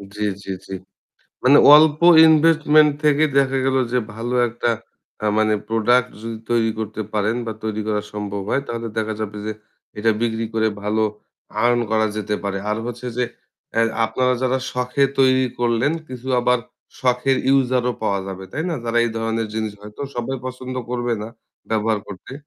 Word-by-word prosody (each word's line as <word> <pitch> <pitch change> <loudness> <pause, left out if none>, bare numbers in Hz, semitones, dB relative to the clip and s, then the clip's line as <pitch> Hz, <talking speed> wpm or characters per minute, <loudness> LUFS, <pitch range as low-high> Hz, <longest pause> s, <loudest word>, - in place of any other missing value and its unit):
জ্বী, 105 0 -2 0.2
জ্বী, 95 - -4
জ্বী। 95 - -6 0.7
মানে 140 +3 +6 0.2
অল্প 155 0 +5 0.3
ইনভেস্টমেন্ট 155 -1 +5
থেকে 150 +1 +4
দেখা 135 -1 +2
গেল 135 0 +2 0.2
যে 125 - +3 0.2
ভালো 120 +2 -4
একটা 120 +1 -1 0.5
আ - - +2
মানে 110 0 +3
প্রোডাক্ট 120 +3 +2
যদি 115 -1 -5
তৈরি 115 -1 +2
করতে 110 0 -4
পারেন 105 +3 +1
বা 110 - -2
তৈরি 110 0 -2
করা 105 -1 0
সম্ভব 100 -1 -4
হয় 140 - +1
তাহলে 115 -1 -4
দেখা 110 0 -1
যাবে 105 -1 -4
যে 110 - -2 0.5
এটা 110 +1 +2
বিক্রি 115 -1 -1
করে 110 0 +2
ভালো 110 +1 0 0.6
আর্ন 120 0 +3
করা 110 0 +2
যেতে 105 0 -2
পারে। 100 0 -2
আর 105 - 0
হচ্ছে 120 +1 -6
যে 125 - +1 0.5
এ - - +5 0.2
আপনারা 125 +3 +1
যারা 130 +1 +1
শখ 125 0 -3
এ - - +8
তৈরি 130 -1 +4
করলেন 120 +4 +1 0.2
কিছু 130 0 -9
আবার 125 0 +2 0.4
শখের 130 +1 +2
ইউসার 130 -2 +3
ও - - -2
পাওয়া 100 -2 0
যাবে। 95 0 -7
তাই 155 - -2
না? - - -1
তারা 115 0 +1
এই 120 - -1
ধরনের 115 0 -1
জিনিস 110 -2 -2
হয়তো 105 +5 -12 0.2
সবাই 130 +3 -2
পছন্দ 130 0 -6 0.2
করবে 120 -1 -1
না 110 - -6 0.4
ব্যবহার 110 -1 +1
করতে। 100 +5 -10
115 Hz, 175 wpm, -21 LUFS, 110-130 Hz, 0.7 s, এ